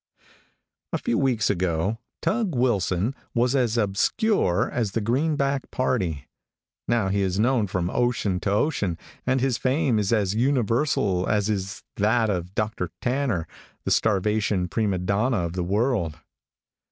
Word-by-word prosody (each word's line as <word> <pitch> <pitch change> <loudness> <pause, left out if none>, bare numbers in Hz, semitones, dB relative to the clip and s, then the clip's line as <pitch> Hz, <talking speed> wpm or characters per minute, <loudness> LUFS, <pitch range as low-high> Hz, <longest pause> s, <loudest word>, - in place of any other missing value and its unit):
A - - 0
few - - -1
weeks 125 -8 +2
ago, 90 +3 -1 0.2
Tug 210 - 0
Wilson 110 -3 +1 0.2
was 120 +3 +2
as 120 -3 +1
obscure 105 - +1
as 110 -5 -1
the - - +1
greenback 140 +4 0
party. 95 - -1 0.6
Now 115 -5 +1
he 100 +1 +1
is 95 -1 0
known 120 -2 +2
from 90 -1 -2
ocean 120 -6 0
to 100 - -2
ocean, 100 - 0 0.3
and 130 0 +2
his 130 -2 +1
fame 130 -3 +1
is 100 0 0
as 105 -4 +2
universal 115 -5 +1
as 105 0 +1
is 100 0 -4
that 110 +1 +2
of 90 0 -4
Dr. 105 -5 -1
Tanner, 125 - 0 0.4
the - - -2
starvation 105 -2 +1
prima 100 +2 0
donna 100 +7 +1
of 85 - -4
the 90 -1 -2
world. 100 - 0
110 Hz, 140 wpm, -25 LUFS, 95-125 Hz, 0.6 s, weeks